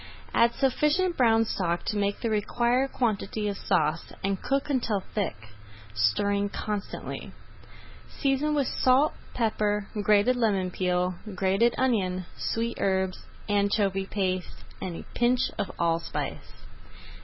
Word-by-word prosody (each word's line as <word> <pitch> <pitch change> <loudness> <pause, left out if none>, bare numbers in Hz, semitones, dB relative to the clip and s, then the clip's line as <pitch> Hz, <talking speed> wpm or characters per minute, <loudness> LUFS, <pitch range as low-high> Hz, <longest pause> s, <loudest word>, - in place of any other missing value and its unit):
Add 235 0 +4
sufficient 300 +7 +2
brown 225 -4 +4
stock 175 -5 -1
to 215 - -1
make 200 0 0
the 230 - -1
required 240 +5 +1
quantity 215 -3 -1
of 200 - -1
sauce 160 -3 0
and 195 -1 -1
cook 275 0 0
until 235 -8 0
thick, 205 - -1 0.6
stirring 200 - +1
constantly. 205 0 -5 0.8
Season 285 +2 0
with 285 -2 +2
salt, 260 +4 +3 0.2
pepper, 210 -3 0
grated 210 +4 +4
lemon 200 -6 +1
peel, 180 0 0 0.2
grated 195 +5 +2
onion, 190 -8 +1
sweet 230 +1 -2
herbs, 190 -1 0 0.2
anchovy 200 -1 +1
paste, 185 -3 -2 0.2
and 180 -2 -4
a - - -8
pinch 245 +1 +2
of 195 - -1
allspice. 165 -1 -2
205 Hz, 120 wpm, -27 LUFS, 190-240 Hz, 0.8 s, Add